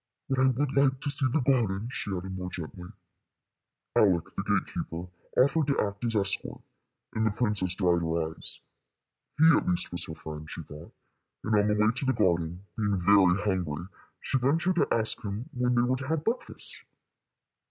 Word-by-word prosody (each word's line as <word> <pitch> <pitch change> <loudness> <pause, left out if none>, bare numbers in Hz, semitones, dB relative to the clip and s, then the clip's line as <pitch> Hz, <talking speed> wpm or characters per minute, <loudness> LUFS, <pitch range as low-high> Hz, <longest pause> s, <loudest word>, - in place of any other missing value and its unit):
But 135 -1 +1
I 130 - +5
would 130 +2 0
like 135 -1 +3
to 145 - 0
see 140 -1 +3
the 145 +4 +1
garden," 115 -6 +1
she 105 - -4
added, 95 0 -4
more 90 -1 -4
gently. 90 +1 -8 1.1
Aleck, 90 -6 +3
the - - -1
gate - - -1
keeper, 85 +2 -5 0.3
offered 140 +3 +4
to 140 - +1
act 100 0 -2
as 115 -1 0
escort, 100 -2 -1 0.5
and 110 0 +1
the - - +3
princess 105 -4 -1
dried 90 -3 +2
her 80 -1 -1
eyes. - - -6 0.8
He 160 - +6
at - - 0
least 180 -1 0
was 90 0 -2
her 80 - -7
friend, 75 0 -8
she 80 - -7
thought; 75 +3 -11 0.5
and 110 - -1
on 105 0 +4
the 105 - +2
way 105 +1 +3
to 130 - -4
the 130 - +2
garden, 90 -3 0
being 105 -3 0
very 95 +1 +4
hungry, 90 -3 -2 0.3
she 135 - -1
ventured 165 +8 +1
to - - +3
ask 110 +1 +2
him 105 +2 -5
when 125 0 +1
they 120 - +4
were 130 +1 +1
to 130 0 -6
have 160 0 -1
breakfast. 240 +2 -4
105 Hz, 190 wpm, -28 LUFS, 90-130 Hz, 1.1 s, He